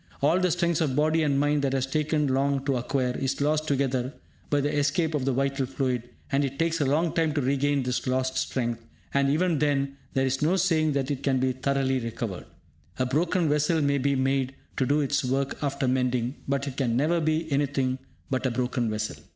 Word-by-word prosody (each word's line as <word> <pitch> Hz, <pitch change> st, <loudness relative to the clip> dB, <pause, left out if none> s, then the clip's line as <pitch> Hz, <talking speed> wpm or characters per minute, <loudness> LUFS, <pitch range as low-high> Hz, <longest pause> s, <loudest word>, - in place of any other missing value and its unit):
All 155 Hz, +6 st, +3 dB
the 185 Hz, -1 st, +2 dB
strength 170 Hz, -1 st, +1 dB
of 140 Hz, -5 st, +1 dB
body 155 Hz, +2 st, +2 dB
and 140 Hz, -3 st, +2 dB
mind 145 Hz, 0 st, +2 dB
that 135 Hz, -1 st, 0 dB
has 135 Hz, -1 st, +1 dB
taken 150 Hz, +2 st, 0 dB
long 135 Hz, 0 st, +1 dB
to 140 Hz, -2 st, +1 dB
acquire, 125 Hz, +1 st, -1 dB
is 135 Hz, -1 st, -1 dB
lost 155 Hz, +2 st, +1 dB
altogether 135 Hz, -3 st, 0 dB, 0.4 s
by 145 Hz, -, +2 dB
the 145 Hz, +1 st, 0 dB
escape 145 Hz, +3 st, +1 dB
of 140 Hz, -4 st, -1 dB
the 135 Hz, -, +2 dB
vital 135 Hz, 0 st, 0 dB
fluid, 125 Hz, -3 st, -2 dB, 0.2 s
and 140 Hz, +1 st, +2 dB
it 135 Hz, 0 st, -3 dB
takes 165 Hz, 0 st, 0 dB
a 140 Hz, -, +2 dB
long 160 Hz, +4 st, +1 dB
time 160 Hz, -2 st, +1 dB
to 145 Hz, -, +1 dB
regain 140 Hz, +1 st, +1 dB
this 125 Hz, 0 st, -2 dB
lost 130 Hz, 0 st, 0 dB
strength, 120 Hz, -3 st, -2 dB, 0.3 s
and 140 Hz, 0 st, +3 dB
even 160 Hz, +1 st, +2 dB
then 140 Hz, -2 st, 0 dB, 0.2 s
there 135 Hz, 0 st, +2 dB
is 135 Hz, +1 st, -1 dB
no 160 Hz, +5 st, +3 dB
saying 155 Hz, -5 st, +2 dB
that 135 Hz, 0 st, -1 dB
it 140 Hz, -2 st, -3 dB
can 135 Hz, -2 st, +1 dB
be 130 Hz, 0 st, +1 dB
thoroughly 135 Hz, 0 st, 0 dB
recovered. 115 Hz, -5 st, -5 dB, 0.5 s
A 130 Hz, -, +1 dB
broken 165 Hz, +6 st, +1 dB
vessel 150 Hz, +2 st, +2 dB
may 140 Hz, -1 st, +2 dB
be 140 Hz, +1 st, +1 dB
made 135 Hz, 0 st, 0 dB, 0.2 s
to 130 Hz, -, +1 dB
do 145 Hz, +2 st, +3 dB
its 140 Hz, 0 st, 0 dB
work 135 Hz, +2 st, -1 dB
after 140 Hz, -2 st, -1 dB
mending, 125 Hz, -1 st, +1 dB
but 140 Hz, 0 st, 0 dB
it 135 Hz, -1 st, -6 dB
can 120 Hz, -4 st, +1 dB
never 160 Hz, +5 st, +2 dB
be 155 Hz, 0 st, 0 dB
anything 135 Hz, -2 st, 0 dB, 0.3 s
but 130 Hz, 0 st, 0 dB
a -, -, +1 dB
broken 125 Hz, -1 st, -1 dB
vessel. 110 Hz, 0 st, -3 dB
140 Hz, 215 wpm, -26 LUFS, 130-150 Hz, 0.5 s, All